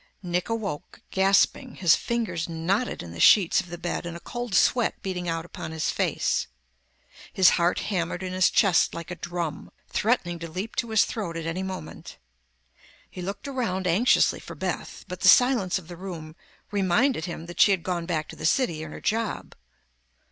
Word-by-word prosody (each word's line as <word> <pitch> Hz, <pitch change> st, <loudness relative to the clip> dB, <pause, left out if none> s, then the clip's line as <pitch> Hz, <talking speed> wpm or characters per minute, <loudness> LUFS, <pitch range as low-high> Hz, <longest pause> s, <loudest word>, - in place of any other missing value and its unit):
Nick 180 Hz, +2 st, -2 dB
awoke 210 Hz, -10 st, -4 dB
gasping, 195 Hz, +6 st, +2 dB
his 175 Hz, -3 st, +5 dB
fingers 225 Hz, -9 st, -2 dB
knotted 180 Hz, -, -1 dB
in 85 Hz, -, -9 dB
the 85 Hz, -, -9 dB
sheets 190 Hz, -, +6 dB
of 185 Hz, -, -13 dB
the 175 Hz, -, -6 dB
bed 175 Hz, +1 st, -3 dB
and 170 Hz, 0 st, -6 dB
a -, -, -11 dB
cold 240 Hz, +1 st, -5 dB
sweat 240 Hz, +3 st, +3 dB
beading 180 Hz, -2 st, -3 dB
out 165 Hz, 0 st, -2 dB
upon 175 Hz, -, -7 dB
his 160 Hz, -1 st, -1 dB
face. -, -, 0 dB, 0.8 s
His 185 Hz, -1 st, +6 dB
heart 175 Hz, 0 st, +1 dB
hammered 175 Hz, -2 st, -2 dB
in 185 Hz, 0 st, -4 dB
his 185 Hz, -1 st, +4 dB
chest 195 Hz, -5 st, +3 dB
like 170 Hz, +1 st, -7 dB
a -, -, -4 dB
drum, 170 Hz, -2 st, -4 dB, 0.2 s
threatening 180 Hz, -7 st, 0 dB
to 165 Hz, 0 st, -6 dB
leap 190 Hz, +7 st, -5 dB
to 235 Hz, -, -1 dB
his 220 Hz, -1 st, +4 dB
throat 175 Hz, -7 st, -4 dB
at 165 Hz, -, -5 dB
any 165 Hz, +3 st, -2 dB
moment. 190 Hz, -1 st, -7 dB, 0.9 s
He 180 Hz, -, -7 dB
looked 200 Hz, +8 st, -5 dB
around 230 Hz, -9 st, -2 dB
anxiously 185 Hz, +8 st, +3 dB
for -, -, -10 dB
Beth, -, -, -4 dB
but -, -, -6 dB
the -, -, +5 dB
silence 245 Hz, -9 st, +5 dB
of 180 Hz, -4 st, -10 dB
the 175 Hz, -, -8 dB
room 165 Hz, -4 st, -8 dB, 0.4 s
reminded 205 Hz, -, +2 dB
him 170 Hz, -2 st, -6 dB
that 175 Hz, 0 st, -2 dB
she -, -, +7 dB
had 190 Hz, -4 st, +1 dB
gone 175 Hz, -2 st, -2 dB
back 155 Hz, -4 st, -1 dB
to -, -, -9 dB
the -, -, -10 dB
city 170 Hz, -, +1 dB
and 160 Hz, -1 st, -7 dB
her -, -, -9 dB
job. 225 Hz, 0 st, -2 dB
180 Hz, 190 wpm, -26 LUFS, 170-205 Hz, 0.9 s, she